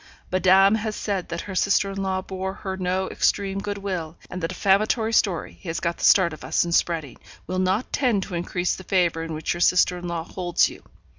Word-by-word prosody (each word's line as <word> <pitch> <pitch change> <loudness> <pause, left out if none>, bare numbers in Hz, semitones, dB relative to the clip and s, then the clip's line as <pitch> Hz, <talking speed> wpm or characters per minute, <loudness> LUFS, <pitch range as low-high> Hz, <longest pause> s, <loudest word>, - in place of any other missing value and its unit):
Madame 190 +2 +5
has 220 -1 -1
said 195 -4 -3
that 170 0 -3
her 200 - -7
sister 195 +1 +2
in 195 0 -4
law 190 -1 -1
bore 190 0 -5
her 190 -2 -5
no 185 0 -1
extreme 195 -1 0
good 205 0 -4
will; 180 -5 -4
and 185 - -5
the 165 - 0
defamatory 215 +5 +1
story 195 -6 +1
he 180 - -7
has 165 - -2
got 170 -1 -2
the - - -8
start 170 -4 +5
of 155 - -10
us - - +1
in 170 - -4
spreading, 165 -6 0 0.3
will 185 0 -2
not 190 +6 0
tend 240 -8 +1
to 185 - -9
increase 175 +1 -1
the 190 - -10
favour 175 -4 +1
in 165 0 -5
which 155 +1 -2
your 175 - -6
sister 180 0 +3
in 175 - -6
law 170 -1 -3
holds 175 0 +1
you. - - -12
185 Hz, 225 wpm, -24 LUFS, 175-195 Hz, 0.3 s, Madame